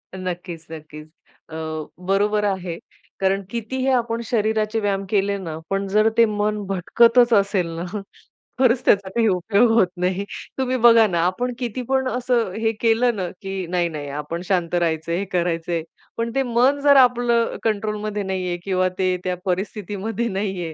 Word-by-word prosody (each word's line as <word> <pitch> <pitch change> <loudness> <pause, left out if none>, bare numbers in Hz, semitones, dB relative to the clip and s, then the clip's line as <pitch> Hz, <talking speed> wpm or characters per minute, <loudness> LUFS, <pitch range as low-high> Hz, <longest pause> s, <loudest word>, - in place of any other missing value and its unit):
नक्कीच 175 -3 -6
नक्कीच, 155 -1 -10 0.4
अ, 160 - -9 0.5
बरोबर 210 +2 +2
आहे. 185 -4 -2 0.4
कारण 195 +1 +1
कितीही 245 +4 -3
आपण 235 -1 0
शरीराचे 220 -1 0
व्यायाम 200 -2 -1
केले 200 -1 +1
ना, 165 -5 -6
पण 195 0 -1
जर 215 +3 +3
ते 230 - +7
मन 210 0 -1
भटकतच 230 +6 +4
असेल 200 -3 +2
ना, 170 - -4 0.7
खरंच 255 -1 +3
त्याचा 200 -2 +3
काही 225 +2 +1
उपयोग 205 +5 +3
होत 225 -5 +4
नाही. 180 +2 0 0.3
तुम्ही 260 -1 0
बघा 230 -1 +7
ना 175 -4 -1
आपण 245 +8 -1
किती 245 0 -3
पण 265 -1 +1
असं 245 -4 0
हे 225 0 +2
केलं 230 +1 +3
ना 185 -3 -2
की 195 -2 -4
"नाही 175 0 0
नाही, 150 -3 -6
आपण 150 +4 -5
शांत 175 -3 0
राहायचंय. 170 -1 0
हे 200 - -2
करायचंय." 170 -2 -1 0.3
पण 230 0 -2
ते 270 - +2
मन 250 +4 +2
जर 285 -1 +6
आपलं 240 -2 +4
अ, - - -6
कंट्रोलमध्ये 210 -1 -2
नाहीये 185 -2 -2
किंवा 185 -1 +1
ते 185 -1 +1
त्या 180 -1 -1
परिस्थितीमध्ये 205 +4 -2
नाहीये, 190 -4 -3
200 Hz, 160 wpm, -22 LUFS, 180-230 Hz, 0.7 s, ते